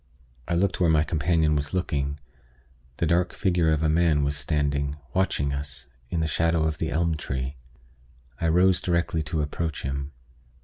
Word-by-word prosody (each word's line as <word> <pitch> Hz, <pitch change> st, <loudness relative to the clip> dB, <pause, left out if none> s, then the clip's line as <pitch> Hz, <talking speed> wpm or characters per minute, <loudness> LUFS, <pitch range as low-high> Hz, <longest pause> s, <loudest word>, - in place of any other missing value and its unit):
I 85 Hz, -, 0 dB
looked 95 Hz, +2 st, +1 dB
where 85 Hz, -, +4 dB
my 80 Hz, -1 st, +4 dB
companion 80 Hz, 0 st, +1 dB
was 70 Hz, +4 st, -1 dB
looking. 70 Hz, -5 st, -1 dB, 0.8 s
The -, -, +1 dB
dark 85 Hz, +2 st, +2 dB
figure 85 Hz, -4 st, +2 dB
of 80 Hz, 0 st, +1 dB
a -, -, +3 dB
man 80 Hz, -2 st, +3 dB
was 70 Hz, +1 st, 0 dB
standing, 70 Hz, 0 st, 0 dB, 0.2 s
watching 70 Hz, -7 st, +1 dB
us, 70 Hz, -2 st, -5 dB, 0.2 s
in 85 Hz, -, -1 dB
the 80 Hz, -, +1 dB
shadow 85 Hz, 0 st, +1 dB
of 80 Hz, -1 st, -1 dB
the 80 Hz, -, -1 dB
elm 80 Hz, +2 st, +1 dB
tree. 65 Hz, -1 st, -4 dB, 0.8 s
I 85 Hz, -, +1 dB
rose 90 Hz, +3 st, +4 dB
directly 85 Hz, -2 st, 0 dB
to 75 Hz, 0 st, -1 dB
approach 80 Hz, +1 st, -3 dB
him. 70 Hz, +1 st, -3 dB
80 Hz, 170 wpm, -26 LUFS, 70-85 Hz, 0.8 s, where